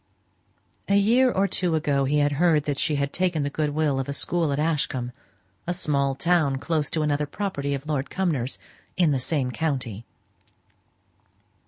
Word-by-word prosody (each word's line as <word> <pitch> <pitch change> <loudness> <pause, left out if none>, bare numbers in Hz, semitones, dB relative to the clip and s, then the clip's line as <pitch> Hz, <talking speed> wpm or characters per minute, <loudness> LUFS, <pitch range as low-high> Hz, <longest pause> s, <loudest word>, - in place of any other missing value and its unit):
A 200 - +4
year 240 +6 +4
or 195 -2 +1
two 180 -4 0
ago 145 -3 +1
he 145 +3 +1
had 145 0 +3
heard 160 -4 +4
that 145 -2 -2
she 150 - +1
had 140 0 -1
taken 175 -4 0
the 140 - -2
good 150 0 -1
will 145 -2 0
of 135 - -3
a - - -1
school 165 +1 0
at 140 - -1
Ashcombe; 140 -5 -1 0.6
a 175 - -1
small 140 -5 +1
town 160 -2 +2
close 150 +1 -1
to 155 - -1
another 150 0 0
property 140 -5 -2
of 135 +1 -7
Lord 150 -3 -2
Cumnor's, 150 -10 -1 0.4
in 175 -4 +4
the 135 - +1
same 130 -1 -1
county. 125 -9 -3
150 Hz, 175 wpm, -25 LUFS, 140-170 Hz, 0.6 s, A